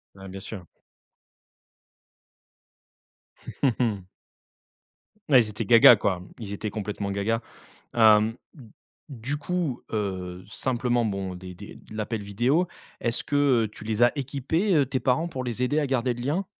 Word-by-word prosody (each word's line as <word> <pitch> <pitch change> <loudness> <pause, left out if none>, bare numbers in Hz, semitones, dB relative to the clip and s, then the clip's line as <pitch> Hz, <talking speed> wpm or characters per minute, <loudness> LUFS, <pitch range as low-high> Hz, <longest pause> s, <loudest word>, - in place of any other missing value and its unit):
Ah 95 0 -11
bien 95 +1 -8
sûr. 95 -3 -8 3.0
Mmh 130 -4 +3
mh. 105 -6 0 1.3
Ouais, 130 -3 +8
ils 110 - -3
étaient 105 +1 -4
gaga, 115 +2 +9
quoi. 95 -3 -1 0.2
Ils 105 -4 -7
étaient 105 +1 -4
complètement 105 -1 -4
gaga, 110 +4 0 0.5
hem, 110 0 +5 0.7
du 135 +2 -4
coup, 160 -4 -2
heu, 95 -4 -3
simplement 120 0 0
bon, 95 -3 -3
des 90 0 -9
des 100 - -10
de 110 - -13
l'appel 110 0 -3
vidéo, 125 - +1 0.3
est-ce 115 -1 -1
que, 140 -5 +3
heu, 110 - -3
tu 105 - -13
les 110 +2 +2
as 120 - +4
équipés, 145 - 0
heu, 140 -3 +3
tes 130 0 -2
parents 135 +6 +1
pour 130 -6 -5
les 125 0 -3
aider 145 +4 +1
à 145 - -1
garder 125 -2 0
le 120 - -7
lien? 165 +9 -1
115 Hz, 150 wpm, -26 LUFS, 100-130 Hz, 3.0 s, gaga